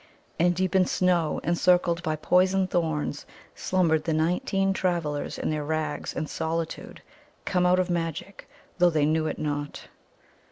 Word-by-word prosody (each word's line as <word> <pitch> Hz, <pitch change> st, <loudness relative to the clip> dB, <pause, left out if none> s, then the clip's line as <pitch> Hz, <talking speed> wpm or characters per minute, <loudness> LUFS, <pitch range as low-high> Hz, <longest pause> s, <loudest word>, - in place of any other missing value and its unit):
And 175 Hz, +1 st, +3 dB
deep 185 Hz, 0 st, -1 dB
in 185 Hz, -1 st, +4 dB
snow, 175 Hz, -4 st, +1 dB
encircled 175 Hz, 0 st, +2 dB
by 155 Hz, -1 st, -1 dB
poison 185 Hz, +4 st, +2 dB
thorns, 160 Hz, -5 st, -2 dB, 0.3 s
slumbered 165 Hz, -4 st, +1 dB
the 165 Hz, -, 0 dB
nineteen 195 Hz, -, +1 dB
travellers 170 Hz, -6 st, -2 dB
in -, -, -2 dB
their 150 Hz, -1 st, -2 dB
rags 155 Hz, 0 st, -3 dB
and 155 Hz, -, -3 dB
solitude, 160 Hz, +1 st, -4 dB, 0.4 s
come 180 Hz, -2 st, +2 dB
out 180 Hz, +1 st, +4 dB
of 185 Hz, 0 st, 0 dB
magic, 170 Hz, +3 st, -4 dB, 0.3 s
though 175 Hz, 0 st, +6 dB
they 155 Hz, -3 st, +1 dB
knew 155 Hz, +1 st, +1 dB
it -, -, -3 dB
not. 145 Hz, -1 st, -4 dB
170 Hz, 150 wpm, -26 LUFS, 155-180 Hz, 0.4 s, though